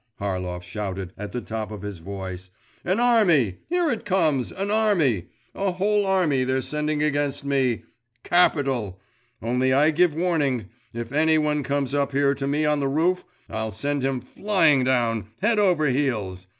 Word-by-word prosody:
Harlov 90 -3 -3
shouted 95 -1 -5
at 105 0 -7
the 125 - -3
top 110 -2 -5
of 105 -2 -8
his 100 -4 -6
voice. 95 0 -7 0.3
'An 185 +5 0
army… 180 - +3
here 350 -3 +1
it 225 - -3
comes, 160 -10 +1
an 195 +2 -3
army! 175 - +2 0.3
A 195 -2 -1
whole 205 +2 +1
army 170 -9 +2
they're 130 0 0
sending 150 0 -1
against 145 -1 -1
me! 135 -4 +1 0.4
Capital! 135 - +1 0.4
Only 125 +3 +1
I 150 +4 +4
give 165 0 +2
warning 145 - 0 0.2
if 115 0 -6
any 155 +2 +3
one 150 -1 +1
comes 140 0 -2
up 140 -1 0
here 140 0 +3
to 135 0 -4
me 150 +2 +1
on 150 -1 +2
the 140 - 0
roof, 170 +6 +1 0.2
I'll 110 0 -3
send 140 +8 -2
him 135 -1 -1
flying 165 - +2
down, 120 -5 +1
head 210 +3 +2
over 180 -7 +3
heels! 110 -10 -1
140 Hz, 165 wpm, -24 LUFS, 115-165 Hz, 0.4 s, I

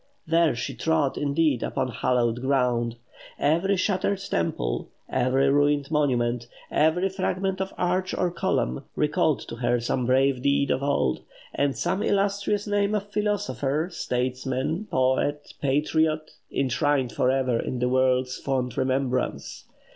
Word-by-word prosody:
There 165 -3 +3
she 135 +3 -4
trod, 155 0 +1
indeed, 145 -2 +1
upon 130 - -1
"hallowed 120 0 0
ground." 125 -3 +1 0.4
Every 175 +6 +2
shattered 195 +1 +1
temple, 85 - -2 0.2
every 130 +2 +2
ruined 145 0 +2
monument, 125 -5 +1 0.2
every 160 +5 +3
fragment 190 0 -2
of 190 - -3
arch 180 +1 0
or 180 -1 0
column, 65 - -1
recalled 150 0 +1
to 115 - -7
her 120 0 +1
some 120 +1 -1
brave 130 0 +3
deed 140 0 +2
of 130 - 0
old; 140 - 0 0.3
or 140 0 +2
some 185 +7 -1
illustrious 200 +1 0
name 205 0 +1
of 205 0 -3
philosopher, 170 -7 -1
statesman, 130 +7 -2
poet, 140 0 0
patriot, 155 +2 +1 0.2
enshrined 135 -1 +1
for 125 - +1
ever 130 -3 +1
in 130 - -3
the 125 0 0
world's 130 0 +2
fond 130 -3 -2
remembrance. 130 -1 -1
140 Hz, 130 wpm, -25 LUFS, 125-170 Hz, 0.4 s, There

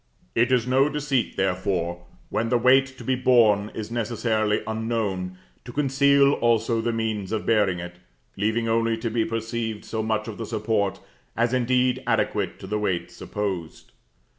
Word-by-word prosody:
It 120 +3 +2
is 125 -2 +3
no 135 +3 +3
deceit, 145 -4 -1
therefore, 90 -2 -1 0.2
when 115 +1 -1
the 120 - +3
weight 130 +3 +5
to - - -9
be 130 - 0
borne 115 -5 +4
is 110 0 -5
necessarily 110 -2 0
unknown, 110 -5 -2 0.3
to 120 - -9
conceal 140 +1 +4
also 115 -1 +1
the 120 +1 0
means 110 -4 -2
of 110 -1 -2
bearing 105 -5 +2
it, 90 0 -8 0.4
leaving 110 +3 0
only 115 0 +1
to 115 0 -3
be 115 0 +1
perceived 115 -1 -3
so 110 - -3
much 110 0 -1
of 110 -1 -7
the 115 - -4
support 105 -3 -1 0.4
as 120 +1 +3
is 130 - +2
indeed 125 +1 +1
adequate 105 -4 0
to - - -7
the 105 +2 -2
weight 95 -4 -1
supposed. 95 -6 -5
115 Hz, 165 wpm, -24 LUFS, 105-120 Hz, 0.4 s, weight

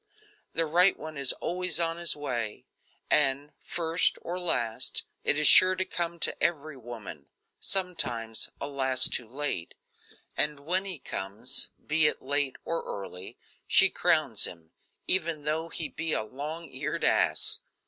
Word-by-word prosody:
The 165 - +1
right 175 +5 +4
one 155 0 -8
is 140 -2 +5
always 180 +1 -1
on 165 0 0
his 170 0 +2
way, 120 -7 -4 0.5
and, 145 0 +2
first 165 0 +1
or 180 +2 -4
last, 120 -11 -1 0.2
is 150 0 +3
sure 185 0 +8
to 185 +1 0
come 170 -2 -4
to - - +1
every 155 -3 -1
woman 110 - -10 0.3
sometimes, 120 - 0
alas! 130 -2 +4
too 120 - -2
late 130 - -4 0.6
and 150 -1 +2
when 180 +6 -1
he 190 -4 -2
comes, 110 -1 -3 0.2
be 155 0 +3
it - - -1
late 140 0 -1
or 165 0 -2
early, 95 -2 -8 0.3
she 195 - +7
crowns 155 - +2
him, 85 -2 -8 0.3
even 165 -5 +1
though 160 +3 -2
he 165 - -4
be 165 0 -3
a - - 0
long 150 +9 -6
eared - - -4
ass. - - +1
150 Hz, 145 wpm, -28 LUFS, 125-170 Hz, 0.6 s, sure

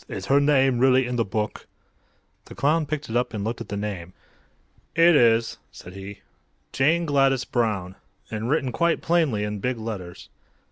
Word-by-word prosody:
Is - - -6
her 140 +1 +4
name 135 -3 +3
really 130 0 +4
in 125 0 -3
the 115 - +2
book?" 105 +1 -4 0.8
The - - -12
clown 155 +2 +1
picked 155 0 -4
it 115 - -5
up 120 -2 0
and 100 - -3
looked 115 +3 -4
at - - -8
the 100 - -3
name. 95 -4 -5 0.8
"It 165 0 +6
is," 115 -3 +3
said 90 - -12
he. 100 +1 -9 0.5
"'Jane 165 +6 +2
Gladys 135 -3 +2
Brown;' 105 -7 -1 0.4
and 110 +2 -3
written 135 -3 0
quite 170 +7 +1
plainly 160 -11 +1
in 105 0 -4
big 125 +4 -2
letters." 100 -6 -7
120 Hz, 175 wpm, -24 LUFS, 105-140 Hz, 0.8 s, It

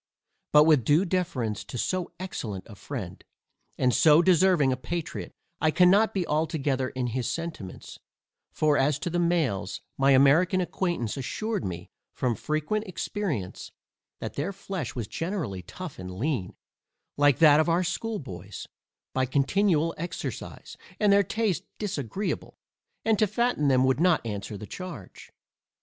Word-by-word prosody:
But 150 0 +8
with 150 -5 +4
due 150 - +3
deference 160 - -1
to - - -7
so 185 +8 -1
excellent 110 - -5
a 110 - -11
friend, 100 -4 -7 0.5
and 125 -1 +2
so 155 +5 +6
deserving 180 -6 +4
a - - 0
patriot, 165 +5 -5 0.3
I 155 - +3
cannot 185 +6 +5
be 185 -3 -1
altogether 150 -4 0
in 130 -1 -3
his 120 0 -2
sentiments; 165 - -6 0.5
for 150 -1 +2
as 140 +1 +2
to 175 - -4
the 175 - 0
males, 140 - 0 0.2
my 135 0 +4
American 155 +8 +5
acquaintance 175 - -2
assured 210 - -3
me 90 -1 -6 0.2
from 125 -2 0
frequent 155 - -2
experience, 170 - -4 0.5
that - - -5
their 155 +8 -2
flesh 190 - -5
was 120 -4 -3
generally 165 - -3
tough 140 - -9
and 90 0 -6
lean, 120 -3 -2 0.6
like 145 -2 +4
that 150 -2 +7
of 155 - +2
our 170 +2 +2
schoolboys, 140 - -5 0.5
by 130 -1 +1
continual 165 +4 +2
exercise, 170 +1 -6 0.2
and 210 -2 +4
their 200 - +6
taste 200 -3 -1
disagreeable, 195 - -3 0.5
and 220 -2 +3
to 215 - +4
fatten 215 -7 +1
them 130 -2 +4
would 130 +1 +2
not 175 -6 +3
answer 105 -1 -4
the 105 - -8
charge. 170 - -9
155 Hz, 145 wpm, -27 LUFS, 125-185 Hz, 0.6 s, But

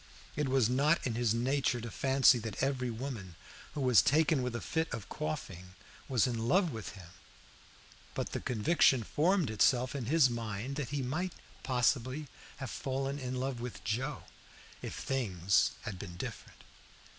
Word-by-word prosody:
It 150 -2 0
was 130 -4 +3
not 140 +7 +2
in 125 - 0
his 120 -1 +1
nature 130 +1 +1
to 115 -1 -6
fancy 135 -1 +4
that 110 +1 -4
every 130 -2 0
woman 115 -7 -6 0.4
who 145 - -2
was 125 -4 +6
taken 155 -1 +3
with 125 -1 -2
a - - -1
fit 160 +4 -2
of 110 -5 -5
coughing 90 +4 -5 0.3
was 130 -2 +3
in 115 -3 -2
love 180 +4 +3
with 115 -4 -6
him, 90 -4 -12 1.1
but - - -2
the - - -2
conviction 125 +1 +3
formed 165 - +2
itself 125 +4 +3
in 130 -4 -3
his 155 0 +5
mind 115 +2 -4
that 140 -5 -3
he 140 -1 -2
might 170 +8 -2 0.3
possibly 130 +3 +1 0.3
have 135 -2 -5
fallen 135 +1 -2
in 130 -1 -4
love 130 -1 -2
with 125 -1 -6
Joe 130 +7 -2 0.6
if - - -5
things 100 -8 +1
had 95 -3 -6
been 90 -4 -8
different. - - -8
125 Hz, 165 wpm, -32 LUFS, 115-140 Hz, 1.1 s, was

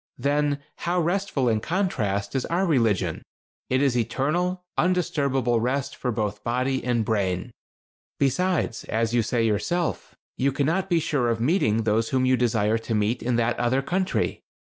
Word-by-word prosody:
Then, 145 +2 +1 0.2
how 175 +1 0
restful, 175 -6 0
in 110 -2 +2
contrast, 115 - -1
is 130 - +1
our 180 +3 +1
religion. 115 - +1 0.5
It 130 +2 +2
is 135 -3 +2
eternal, 155 +10 0
undisturbable 140 -9 +1
rest 130 +3 -1
for 125 - -2
both 105 -2 -3
body 130 +2 0
and 120 -3 0
brain. 100 -1 -1 0.7
Besides, 145 -2 0
as 115 +1 -1
you 120 - +4
say 115 +1 0
yourself, 115 - -1 0.2
you 140 +2 +2
cannot 160 +8 0
be 170 -2 +3
sure 140 -6 0
of 115 -1 0
meeting 115 - +2
those 110 +1 +1
whom 130 -1 +1
you 130 0 +4
desire 115 -2 +1
to 115 0 -3
meet 105 +3 0
in 125 -1 0
that 120 0 +1
other 130 +3 +1
country. 185 +5 -1
125 Hz, 160 wpm, -25 LUFS, 115-155 Hz, 0.7 s, you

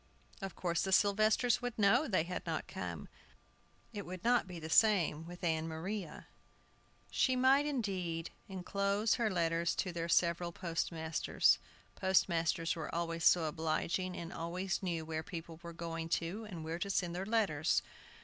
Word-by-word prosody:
Of 195 -2 -5
course 170 -2 0
the 190 - -1
Sylvesters 215 +5 +3
would 245 -1 -4
know 230 +8 +4
they 185 -8 +2
had 180 +2 -4
not - - -2
come. - - -5 0.9
It 205 -1 -4
would 185 0 -8 0.2
be 180 -2 -7
the 160 - -6
same 165 -5 +3
with 175 +1 -10
Ann 160 -1 0
Maria. 170 +2 -5 0.9
She 260 - +2
might, 265 +3 +4
indeed, 185 - -2 0.2
inclose 200 +3 0
her 225 - +3
letters 170 -2 +1
to 185 - -1
their 170 0 -3
several 170 0 +2
postmasters. 165 -2 +1 0.3
Postmasters 170 -3 +1
were 160 -1 -5
always 165 -1 -2
so 175 - +6
obliging, 165 +4 -1
and 170 0 -6
always 180 +3 -2
knew 170 -4 -2
where 160 0 -3
people 165 -1 -8
were 170 - -8
going 165 -1 -5
to, 185 +7 -5
and 170 -5 -6
where 165 +2 -4
to 200 - -2
send 180 -3 0
their 185 - -2
letters. 185 -9 +2
175 Hz, 155 wpm, -34 LUFS, 165-200 Hz, 0.9 s, so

